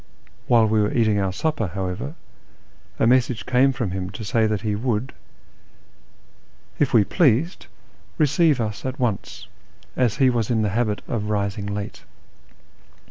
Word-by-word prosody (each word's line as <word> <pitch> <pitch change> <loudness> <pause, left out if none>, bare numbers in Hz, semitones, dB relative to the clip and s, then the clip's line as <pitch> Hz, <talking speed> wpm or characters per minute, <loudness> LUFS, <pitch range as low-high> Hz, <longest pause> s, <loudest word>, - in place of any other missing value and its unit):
While 115 -2 +5
we 110 0 +2
were 105 - +1
eating 110 -3 +2
our 95 -1 0
supper, 145 +1 -1
how 95 -1 -2
ever, 90 - -5 0.8
a - - +2
message 120 -3 +2
came 130 +2 +3
from 120 -7 -3
him 95 0 -4
to 110 - -7
say 110 +2 +2
that 105 -2 -1
he 105 -2 -1
would, 115 +3 -2 1.7
if 145 - +2
we 115 -4 +5
pleased, 155 - +1 0.5
receive 155 -1 +3
us 105 -3 -3
at 130 +2 -4
once, 115 -6 -3 0.5
as 120 -5 +1
he 130 -2 +4
was 115 -3 -1
in 110 -3 +1
the 105 - +1
habit 105 0 -1
of 105 -3 -3
rising 100 -1 -2
late. 100 0 -5
110 Hz, 155 wpm, -23 LUFS, 105-130 Hz, 1.7 s, While